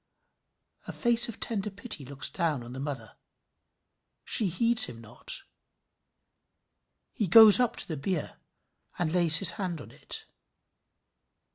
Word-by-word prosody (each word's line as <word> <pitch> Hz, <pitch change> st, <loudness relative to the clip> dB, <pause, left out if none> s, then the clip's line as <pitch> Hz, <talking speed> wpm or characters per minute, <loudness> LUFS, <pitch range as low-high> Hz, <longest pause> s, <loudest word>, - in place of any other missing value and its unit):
A -, -, -6 dB
face 240 Hz, 0 st, +2 dB
of 230 Hz, -, -10 dB
tender 210 Hz, -3 st, -4 dB
pity 200 Hz, -, -5 dB
looks 140 Hz, +2 st, -5 dB
down 160 Hz, -8 st, -4 dB
on 120 Hz, +1 st, -12 dB
the 130 Hz, -, -9 dB
mother. 135 Hz, -7 st, -8 dB, 1.1 s
She 215 Hz, -, 0 dB
heeds 230 Hz, +6 st, +3 dB
him 115 Hz, -, -11 dB
not. 115 Hz, -2 st, -7 dB, 1.7 s
He 210 Hz, -, -3 dB
goes 220 Hz, +4 st, +7 dB
up 245 Hz, -2 st, -1 dB
to -, -, -3 dB
the 160 Hz, -, -6 dB
bier, 170 Hz, +3 st, -5 dB, 0.6 s
and 170 Hz, -2 st, -3 dB
lays 170 Hz, -3 st, +7 dB
his 190 Hz, -3 st, +6 dB
hand 175 Hz, -4 st, -5 dB
on -, -, -13 dB
it. -, -, -7 dB
175 Hz, 135 wpm, -26 LUFS, 145-220 Hz, 1.7 s, goes